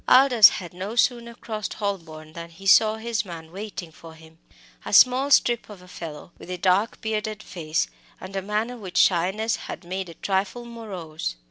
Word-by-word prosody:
Aldous 255 -5 +8
had 175 -2 -7
no 190 +5 -5
sooner 235 -1 +1
crossed 215 -4 -5
Holborn 160 -7 -5
than 170 0 -8
he 175 +4 -15
saw 215 +2 +6
his 220 -2 -2
man 165 -4 -9
waiting 190 -3 -7
for 160 +1 -13
him, 160 0 -18 0.4
a - - -6
tall 255 +3 +6
strip 240 -5 +3
of 205 -3 -10
a - - -16
fellow, 165 -2 -9
with - - -12
a 180 - -3
dark 190 +5 +1
bearded 215 -1 -3
face, 160 -3 -2 0.3
and 190 +1 -9
a 195 - -1
manner 215 +5 -2
which 190 -6 -6
shyness 195 +6 +2
had - - -7
made 185 +1 -5
a 165 - -11
trifle 200 +5 -2
morose. 185 - -6
195 Hz, 180 wpm, -24 LUFS, 170-220 Hz, 0.4 s, Aldous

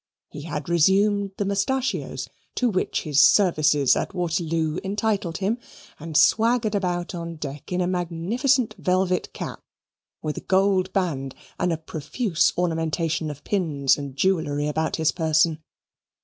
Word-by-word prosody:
He 150 - -8
had 150 +1 -5
resumed 195 +4 +3
the 205 - -1
mustachios 225 +7 -1 0.3
to 250 - +1
which 185 - -1
his 150 -3 +3
services 150 -6 +4
at - - -3
Waterloo 165 -2 -1
entitled 200 -3 -1
him, 210 +5 -1 0.4
and 155 0 -2
swaggered 230 -1 +3
about 180 -2 -1
on 170 -1 -5
deck 145 0 -7
in 180 0 0
a - - +1
magnificent 190 +8 0
velvet 185 +2 0
cap - - -6 0.6
with 155 -1 -3
a - - -4
gold 190 -1 +2
band 145 -9 -2 0.2
and 180 - +1
a 165 - 0
profuse 160 - 0
ornamentation 165 -2 -1
of 145 -1 -8
pins 145 -9 +1
and 140 -2 -7
jewellery 150 -4 0
about 160 +1 -1
his 160 -1 +2
person. 160 0 +1
175 Hz, 140 wpm, -24 LUFS, 155-195 Hz, 0.6 s, services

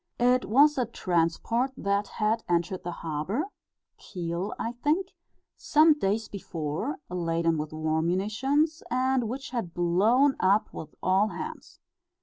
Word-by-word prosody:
It 250 +1 +3
was 280 +6 +4
a 245 - 0
transport 190 +7 0
that 200 +1 0
had 220 +1 -1
entered 175 +2 0
the 175 - -4
harbour 170 - -3 0.5
Kiel, 175 +2 -4
I 230 - -2
think 300 +10 0 0.5
some 310 +1 +5
days 220 -5 -1
before, 170 - -4
laden 165 -2 0
with 150 0 -4
war 155 0 -1
munitions, 255 - 0
and 255 -2 +1
which 270 +3 -6
had 225 -10 -4
blown 215 +11 +3
up 200 +3 +2
with 155 - -8
all 190 +3 +3
hands. - - -7
210 Hz, 135 wpm, -27 LUFS, 170-255 Hz, 0.5 s, some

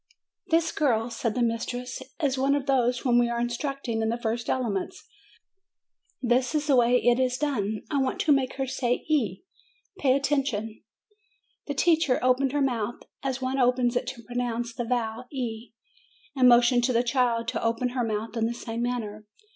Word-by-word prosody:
"This 325 0 +2
girl," 240 -6 +1
said 230 -1 -2
the 245 - +1
mistress, 245 +2 -3 0.2
"is 275 -2 +2
one 275 +1 +2
of 285 -2 -2
those 250 -3 +2
whom 245 -2 +2
we 240 0 +2
are 235 0 -2
instructing 240 -1 -2
in 220 - 0
the 230 - -1
first 235 0 -3
elements. 245 - -2 1.2
This 250 +4 +2
is 300 -1 +1
the 285 -2 +3
way 245 0 +4
it 245 0 +3
is 255 -1 +1
done. 220 -8 -1
I 285 - +1
want 265 - -1
to 310 - +2
make 270 -2 +2
her 270 - -1
say 250 -2 -1
e. 255 - 0 0.6
Pay 265 -5 +3
attention." 270 -6 -1 0.9
The 285 - -3
teacher 320 -3 +3
opened 255 +1 +3
her 290 +1 0
mouth, 240 -3 -2 0.2
as 265 -1 -3
one 260 +1 -1
opens 250 -1 +2
it 245 - -1
to 235 -3 -6
pronounce 240 -1 -3
the 240 - -3
vowel 230 0 -2
e, 235 -4 -5 0.6
and 255 -2 +6
motioned 240 0 +5
to 255 - +1
the 235 +1 +3
child 240 -2 +1
to 240 -3 -3
open 230 +2 0
her 245 0 -1
mouth 220 0 -3
in 225 -1 +1
the 235 - -3
same 230 -1 -5
manner. 220 -4 -3
245 Hz, 185 wpm, -26 LUFS, 230-265 Hz, 1.2 s, and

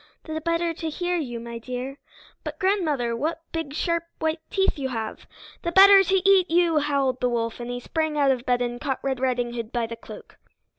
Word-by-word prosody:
"The 315 0 -5
better 335 +1 0
to 325 0 -4
hear 355 +3 -2
you, 245 -7 -4
my 235 0 -7
dear!" 255 +3 -6 0.4
"But, - - -6
grandmother, 310 - +1
what 315 +6 -2
big 320 -3 -4
sharp 335 +1 0
white 320 0 -1
teeth 385 -5 +1
you 265 -1 -2
have!" 225 -3 -5 0.3
"+The 340 - -2
better 390 +2 +9
to 385 0 +1
eat 380 -2 +5
you!+" 335 -2 +3
howled 280 -3 0
the 250 - +2
wolf, 230 -1 -2
and 240 0 -6
he 245 0 -3
sprang 315 +3 -2
out 280 -2 +4
of 250 -2 -1
bed 245 -1 +1
and 240 0 -4
caught 270 -3 -2
Red 265 -2 -1
Riding 245 -2 0
Hood 230 -1 -5
by 240 -2 0
the 230 0 -6
cloak. 230 - -12
280 Hz, 210 wpm, -25 LUFS, 245-335 Hz, 0.4 s, better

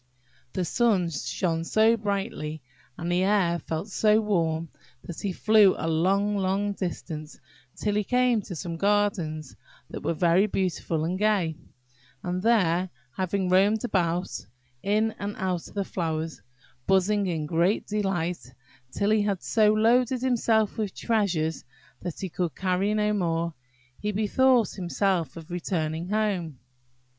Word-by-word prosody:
The 185 - -1
sun 200 -6 +2
shone 165 +2 -2
so 220 +6 +4
brightly, 200 - -3 0.3
and 170 +1 -3
the 175 +1 +2
air 190 -3 +2
felt 160 +7 -4
so 215 +2 +3
warm, 165 -6 0 0.3
that 170 - -8
he 200 - -1
flew 210 +1 +5
a 160 - -3
long, 195 +6 +2
long 195 +1 0
distance, 160 -5 -5 0.4
till 210 - -1
he 210 0 +1
came 250 0 +2
to 185 - -8
some 170 0 -5
gardens 195 -7 0 0.4
that - - -6
were 170 - -1
very 175 +5 +3
beautiful 175 -5 -1
and 180 +3 -2
gay; 200 -7 +2 0.7
and 180 0 -2
there 185 -5 +2 0.3
having 190 0 -1
roamed 200 +4 +3
about, 180 -5 0 0.5
in 215 +2 +1
and 205 +1 -4
out 180 -2 -2
of - - -16
the 200 -1 -1
flowers, 160 -3 -3 0.5
buzzing 195 +1 +2
in 160 -4 -2
great 170 +6 +1
delight, 175 - -2 0.4
till 200 +8 0
he 215 -1 +4
had 200 -3 -1
so 215 -2 +4
loaded 240 +3 +3
himself 225 -4 +1
with 210 -3 -2
treasures 180 -8 0 0.4
that 175 - -6
he 190 - -2
could 175 -1 -3
carry 190 +2 0
no 210 0 +1
more, 170 -4 -1 0.5
he 210 - -2
bethought 230 +3 +3
himself 180 -2 -1
of 165 +1 -10
returning 165 -1 -2
home. 195 -8 -1
190 Hz, 145 wpm, -26 LUFS, 170-210 Hz, 0.7 s, flew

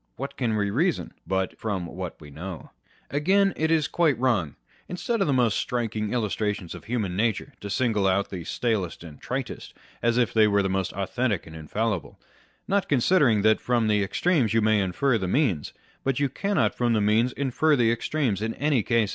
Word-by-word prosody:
What - - -6
can 115 -4 0
we 100 -1 0
reason, 165 - 0
but 95 0 -1
from 100 -5 -2
what 90 +1 -7
we 75 -2 -12
know? 85 +4 -8 0.4
Again, 190 +7 +3
it 160 +1 0
is 160 -2 +2
quite 160 -8 +2
wrong, 115 - 0 0.3
instead 210 +5 -2
of 195 - +2
the - - +2
most 120 -5 +2
striking 110 -3 -2
illustrations 105 -5 -2
of - - -10
human 110 -6 -2
nature, 110 +1 -1
to 100 - -6
single 110 -3 +1
out 95 +1 +1
the 90 -3 -5
stalest, 100 -3 -2
and 80 -4 -12
tritest, - - -5 0.3
as 120 0 +2
if 125 -2 +2
they 110 -1 +5
were 100 -1 +2
most 95 -1 -1
authentic 100 +1 -1
and 80 - -11
infallible; 95 +5 -3 0.5
not 200 0 0
considering 130 - +3
that 110 0 +4
from 120 -2 +1
the 105 -1 +2
extremes 120 - +1
you 115 - +4
may 110 -1 +3
infer 115 +7 +1
the 95 - -2
means, 100 - +1 0.3
but 135 -1 0
you 140 -1 +1
cannot 200 +9 0
from 120 -1 +1
the 110 - +2
means 110 +4 +3
infer 140 +3 +2
the 120 -4 +3
extremes 120 -3 -1
in 110 +1 -2
any 145 -3 +1
case. 115 -1 +1
115 Hz, 190 wpm, -25 LUFS, 100-130 Hz, 0.5 s, they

